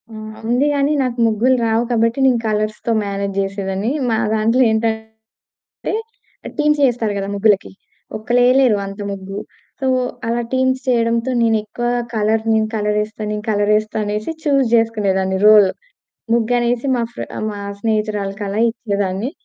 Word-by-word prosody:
హ్మ్. 215 -1 -8 0.2
ఉంది 250 +4 +2
గానీ 285 +1 +2
నాకు 250 -1 -3
ముగ్గులు 235 +4 +2
రావు 225 +1 +2
కాబట్టి 230 +2 +1
నేను 250 -3 +3
కలర్స్‌తో 215 +2 -1
మ్యానేజ్ 200 -1 -3
జేసేదాన్ని. 195 +2 -2 0.2
మా 225 - +1 0.2
దాంట్లో 225 +4 +2
ఏంటంటే 220 0 -4 1.1
టీమ్స్ 300 0 +2
యేస్తారు 235 -5 +1
గదా! 195 0 -3
ముగ్గులకి. 200 -1 +2 0.5
ఒక్కళ్ళెయలేరు 245 +1 +3
అంత 195 +1 -8
ముగ్గు. 195 0 -6 0.4
సో 265 - -1 0.4
అలా 235 +1 0
టీమ్స్ 260 0 +1
చేయడంతో 235 0 +1
నేనెక్కువ 225 +1 0 0.3
కలర్ 220 +1 +1
నేను 220 0 +2
కలరేస్తా 210 +1 -1
నేను 210 0 -4
కలరేస్తా 210 +1 +1
అనేసి 210 +7 -3
చూజ్ 275 -4 +2
జేసుకునేదాన్ని 200 -5 +1
రోల్. 210 -2 +8 0.7
ముగ్గు 235 +1 +1
అనేసి 240 +2 0
మా 240 - 0
ఫ్ర - - -5 0.3
మా 205 - -7 0.2
స్నేహితురాలకలా 210 -2 -2
ఇచ్చేదాన్ని. 205 0 -2
220 Hz, 130 wpm, -18 LUFS, 210-240 Hz, 1.1 s, రోల్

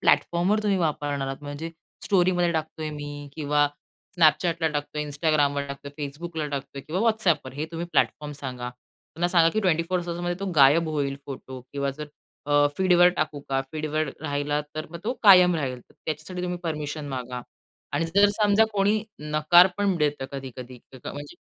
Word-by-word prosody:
प्लॅटफॉर्मवर 180 +5 +3
तुम्ही 205 -2 +2
वापरणार 145 -4 -1
आहात. 135 +2 -6
म्हणजे 145 +3 -6 0.3
स्टोरीमध्ये 180 -2 +2
टाकतोय 155 -1 -3
मी 145 -1 -7
किंवा 145 -1 +2 0.5
Snapchatला 165 +1 +3
टाकतोय, 150 0 -3
Instagramवर 145 -1 +1
टाकतोय, 140 0 -8
Facebookला 155 +2 -4
टाकतोय 140 -1 -5
किंवा 170 +7 -3
WhatsAppवर, 190 - +1
हे 145 +2 -3
तुम्ही 170 +1 -4
प्लॅटफॉर्म 150 -1 +1
सांगा. 125 -3 -5
त्यांना 160 +7 -6
सांगा, 170 -2 +5
की 215 - +2
24 180 -1 +1
तासामध्ये 175 +1 -2
तो 195 - -2
गायब 150 +4 +6
होईल 140 -3 -1
फोटो 130 -1 -8
किंवा 140 -1 -1
जर 150 - -5 0.4
अ, 145 0 +4
फीडवर 180 -2 +5
टाकू 155 -2 -1
का? 135 -1 +1
फीडवर 155 0 -1
राहिला 145 -1 -1
तर 155 - -4
मग 170 - -7
तो 240 - 0
कायम 180 -4 +8
राहील. 130 -4 -3
तर - - -24
त्याच्यासाठी 160 +4 -4
तुम्ही 180 0 -2
परमिशन 150 -2 -4
मागा 125 -2 -4 0.5
आणि - - +1
जर 200 +1 +6
समजा 205 +1 +5
कोणी 205 +1 +2 0.2
नकार 155 +4 +5
पण 200 -2 +2
देतं, 150 -3 0
कधी-कधी 130 -2 -8
क 130 - -12
म्हणजे 145 +4 -7
155 Hz, 160 wpm, -25 LUFS, 145-175 Hz, 0.5 s, कायम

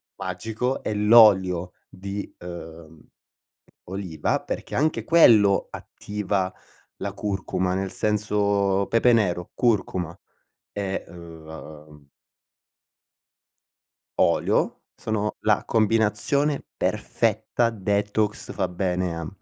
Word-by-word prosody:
magico 110 +7 -3
è 105 - -3
l'olio 100 -5 +5
di, 100 +2 -6
uhm, 80 -2 -10 0.9
oliva, 90 -5 -2
perché - - -5
anche 155 +3 0
quello 110 -12 +5
attiva 100 -2 -3 0.4
la 100 0 -4
curcuma, 95 -2 -2
nel 95 0 -2
senso: 100 -2 +1
pepe 115 +2 +4
nero, 90 -6 +1
curcuma 95 -7 0 0.6
e 100 -2 -3
uhm 80 -3 -12 2.1
olio, - - +1
sono 105 -1 -2
la 105 -1 +2
combinazione 115 +6 +1
perfetta, 120 -1 0
detox 105 0 -1
fa 95 -2 -1
bene 90 -1 -1
a 85 -1 -5
100 Hz, 85 wpm, -24 LUFS, 90-105 Hz, 2.1 s, l'olio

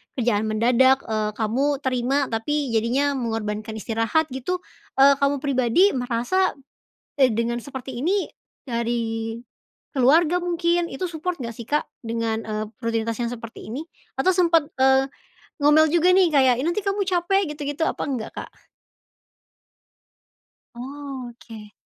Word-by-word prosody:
kerjaan 220 -4 +1
mendadak, 250 +5 +3
eee, 215 -1 -1
kamu 230 +6 0 0.2
terima 255 +1 0
tapi 275 +4 -1
jadinya 240 +6 +1
mengorbankan 220 -2 -3
istirahat 225 +8 0
gitu, 355 +8 -3 0.3
eee, 275 +1 +6
kamu 280 0 +1
pribadi 275 - +3
merasa, 245 +9 0 0.7
eee, 265 - +7
dengan 235 +1 -1
seperti 260 -1 -7
ini 380 +7 +1 0.4
dari 230 -2 -2 0.6
keluarga 310 +6 +4
mungkin, 345 0 +1
itu 270 - -4
support 340 +2 -4
enggak 235 -2 -5
sih 235 - -8
Kak? 295 +1 +1 0.2
Dengan, 225 -1 -1
eee, 215 -1 -3 0.2
rutinitas 230 -1 -1
yang 235 -1 -1
seperti 230 -2 -9
ini? 260 +7 -4 0.4
Atau 370 - +3
sempet, 335 -4 +3
eee, 265 0 +4 0.5
ngomel 300 +2 +5
juga 345 +2 +4
nih 375 -2 +5
kayak, 265 -4 +5
"Ih - - -2
nanti 345 +5 0
kamu 395 +1 0
capek 375 +2 +2
gitu-gitu," 290 +1 -4
apa - - -2
enggak, 245 -5 -3
Kak? - - -5 2.3
Oke. 245 -5 -9
260 Hz, 130 wpm, -23 LUFS, 230-300 Hz, 2.3 s, eee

